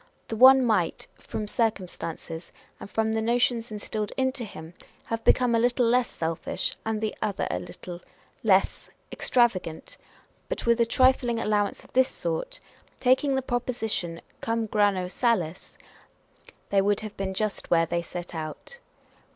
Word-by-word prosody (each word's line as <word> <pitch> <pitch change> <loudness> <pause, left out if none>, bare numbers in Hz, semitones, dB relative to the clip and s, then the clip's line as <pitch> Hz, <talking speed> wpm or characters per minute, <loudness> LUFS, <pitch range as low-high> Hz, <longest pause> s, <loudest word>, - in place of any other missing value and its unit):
The 225 - -2
one 260 +2 +8
might, 185 -8 +1
from 215 -1 -5
circumstances, 180 -6 -3 0.3
and - - -9
from 220 +1 0
the 220 - 0
notions 240 0 +1
instilled 210 0 -4
into 260 -1 0
him, 165 -6 -9 0.3
have 225 0 -4
become 250 -2 +4
a 230 - +4
little 245 +1 +2
less 245 +1 +3
selfish, 165 0 -2
and 220 -1 -1
the 215 -1 -2
other 210 -3 -1
a 90 - -1
little 175 - -9 0.4
les: 195 -3 +2 0.2
extravagant; 200 -10 0 0.5
but - - -3
with 235 0 +3
a 230 - +3
trifling 255 -1 +3
allowance 210 -2 0
of - - -20
this 260 +1 +4
sort, - - -4 0.4
taking 265 +2 +3
the 265 - 0
proposition 225 -9 -2 0.2
cum 230 0 -1
grano 205 -4 +2
salis, 185 -5 -1 0.9
they 200 -1 +4
would 205 +1 +1
have 215 -1 -7
been 190 -1 -3
just 215 0 -2
where 165 -1 +4
they 170 +1 -1
set 175 +1 -7
out. 160 - -7
220 Hz, 150 wpm, -26 LUFS, 185-245 Hz, 0.9 s, one